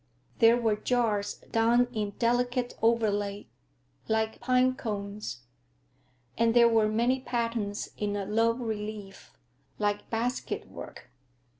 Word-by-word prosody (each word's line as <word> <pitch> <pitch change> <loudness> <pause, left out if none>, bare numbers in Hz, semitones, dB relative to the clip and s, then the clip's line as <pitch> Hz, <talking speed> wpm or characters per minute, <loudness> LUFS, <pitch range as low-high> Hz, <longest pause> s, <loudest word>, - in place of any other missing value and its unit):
There 230 0 +6
were 225 -3 +1
jars 215 -3 0
done 235 +2 +2
in 215 -2 -1
a - - -7
delicate 245 +2 0
overlay, 205 -3 +1 0.6
like 220 0 0
pine 255 0 +3
cones; 200 - -5 0.9
and 230 0 +2
there 235 -1 +7
were 225 -2 +3
many 235 +4 +1
patterns 230 -5 -2
in 205 -1 -2
a 200 -1 -2
low 225 +3 +2
relief, 215 -4 -6 0.5
like 205 -1 -1
basket 235 +3 -2
work. 125 - -11
225 Hz, 120 wpm, -28 LUFS, 205-240 Hz, 0.9 s, there